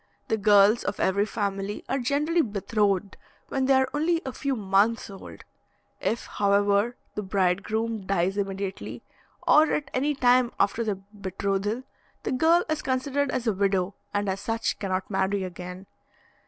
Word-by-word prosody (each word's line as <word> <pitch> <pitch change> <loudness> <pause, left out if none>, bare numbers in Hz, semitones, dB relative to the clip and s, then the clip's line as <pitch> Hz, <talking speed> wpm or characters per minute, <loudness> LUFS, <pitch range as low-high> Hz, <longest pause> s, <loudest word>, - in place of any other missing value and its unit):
The 220 - +2
girls 205 +1 +5
of 200 - -3
every 200 +2 +2
family 200 -2 -3
are 270 - 0
generally 295 +7 +1
betrothed 205 - 0 0.3
when 265 -1 0
they 270 0 +4
are 265 0 +3
only 325 +3 +1
a 265 - -4
few 275 -1 -2
months 205 +1 +1
old; 195 - -11 0.6
if, 230 - -1
however, 200 +3 +2 0.2
the 210 - -3
bridegroom 200 +3 -1
dies 190 0 +1
immediately, 195 -1 -4 0.4
or 310 +1 +6
at 285 -2 -2
any 285 +3 +1
time 250 -2 +3
after 210 +3 +2
the 210 -3 -1
betrothal, 200 +3 -3 0.4
the - - -2
girl 325 +6 +4
is 310 -1 -1
considered 275 +1 0
as 255 - -2
a 220 - +2
widow, 195 -1 +1 0.2
and 205 0 -1
as 190 0 -2
such 225 +2 -1
cannot 185 -2 -2
marry 195 0 0
again. 180 +1 -7
205 Hz, 155 wpm, -26 LUFS, 195-255 Hz, 0.6 s, or